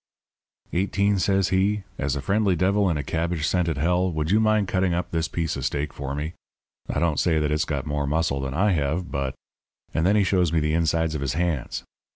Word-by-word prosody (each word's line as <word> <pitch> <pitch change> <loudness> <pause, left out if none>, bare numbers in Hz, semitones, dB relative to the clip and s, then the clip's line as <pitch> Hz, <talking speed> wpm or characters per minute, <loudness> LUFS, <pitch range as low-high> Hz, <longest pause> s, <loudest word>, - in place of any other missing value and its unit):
"'Eighteen,' 100 +2 +1
says 95 0 +2
he, 95 +2 +1 0.2
'as 70 +1 0
a 70 - -4
friendly 100 -2 +2
devil 95 +3 +2
in 80 - 0
a 75 - -2
cabbage 80 -1 -1
scented 85 -5 0
hell, 90 +4 +1
would 80 +1 -1
you 105 - +5
mind 110 -2 +2
cutting 95 -2 +1
up 90 0 -3
this 80 -1 0
piece 80 -2 -2
of - - -5
steak 70 0 -2
for 70 -1 -4
me? 75 +3 -4 0.6
I - - 0
don't 80 -3 +1
say 85 -3 +2
that 75 -1 0
it's 75 +1 +1
got 70 -3 -3
more 75 -1 -1
muscle 75 -2 0
than 65 0 -4
I 105 +5 +3
have, 80 +2 -1
but 70 -1 -2 0.3
' - - -42
And 80 - +1
then 100 +4 +4
he 105 - +4
shows 90 -3 +2
me 85 - +2
the 75 0 0
insides 80 -1 +1
of 75 - -3
his 70 -3 -1
hands. 85 -4 -2
85 Hz, 225 wpm, -24 LUFS, 75-95 Hz, 0.6 s, you